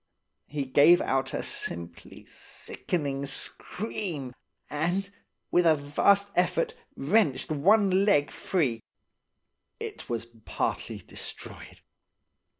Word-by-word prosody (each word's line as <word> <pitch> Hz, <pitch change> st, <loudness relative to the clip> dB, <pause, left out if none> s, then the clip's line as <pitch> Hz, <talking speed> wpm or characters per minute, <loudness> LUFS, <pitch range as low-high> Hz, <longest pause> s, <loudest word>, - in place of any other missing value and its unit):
He 145 Hz, -1 st, -3 dB
gave 150 Hz, +6 st, +6 dB
out 135 Hz, 0 st, 0 dB
a -, -, -3 dB
simply 85 Hz, 0 st, -3 dB
sickening 140 Hz, -5 st, -3 dB
scream, 165 Hz, -, -3 dB, 0.3 s
and, 175 Hz, +6 st, -1 dB, 0.4 s
with 175 Hz, -1 st, +4 dB
a 160 Hz, -, +6 dB
vast 195 Hz, +8 st, +2 dB
effort, 460 Hz, -, +1 dB, 0.2 s
wrenched 155 Hz, -2 st, +1 dB
one 195 Hz, +5 st, +4 dB
leg 150 Hz, -8 st, +3 dB
free. 135 Hz, -, -1 dB, 1.0 s
It -, -, -7 dB
was 115 Hz, -1 st, -2 dB, 0.2 s
partly -, -, -2 dB
destroyed. -, -, -7 dB
155 Hz, 95 wpm, -28 LUFS, 135-195 Hz, 1.0 s, gave